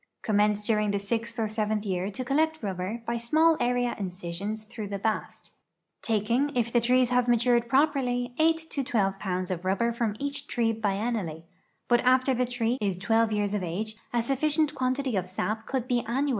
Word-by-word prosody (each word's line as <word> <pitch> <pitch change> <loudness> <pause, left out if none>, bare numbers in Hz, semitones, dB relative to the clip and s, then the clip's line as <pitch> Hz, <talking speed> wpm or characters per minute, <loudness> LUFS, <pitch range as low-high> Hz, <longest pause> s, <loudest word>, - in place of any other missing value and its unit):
Commence 210 0 +2
during 210 -1 +2
the 200 - +1
sixth 230 +4 -3
or 225 -2 0
seventh 215 0 -1
year 185 0 -1
to 230 +6 -5
collect 315 +2 +1
rubber 195 +4 -3
by 235 +1 -1
small 315 +7 +4
area 245 0 +1
incisions 190 +3 -4
through 215 -1 -7
the 200 0 -3
bast, 215 +2 -3 0.5
taking, 230 +6 +1
if 235 -1 0
the 240 - +4
trees 250 +1 +3
have 250 0 +3
matured 240 0 +3
proper! 285 +3 +3
\% 245 -1 -1
8 320 0 +2
to 275 - -1
12 200 -7 0
pounds 185 -1 -2
of 180 -1 -3
rubber 195 +5 +1
from 230 -3 -1
each 285 +2 -5
tree 230 -2 +1
bienniall}', 205 -6 -2 0.4
but 240 -1 +4
after 255 +1 +3
tjie 250 0 0
tree 245 0 0
is 195 -3 0
12 225 +3 +2
years 205 -1 0
of 205 - 0
age 200 +6 -3 0.2
a 235 -1 +1
sufficient 295 +4 +1
quantity 260 -2 -1
of 185 -2 -1
sap 215 +4 -3
could 260 -2 -2
be 245 -2 +1
annual! 270 +5 0
230 Hz, 190 wpm, -27 LUFS, 205-250 Hz, 0.5 s, small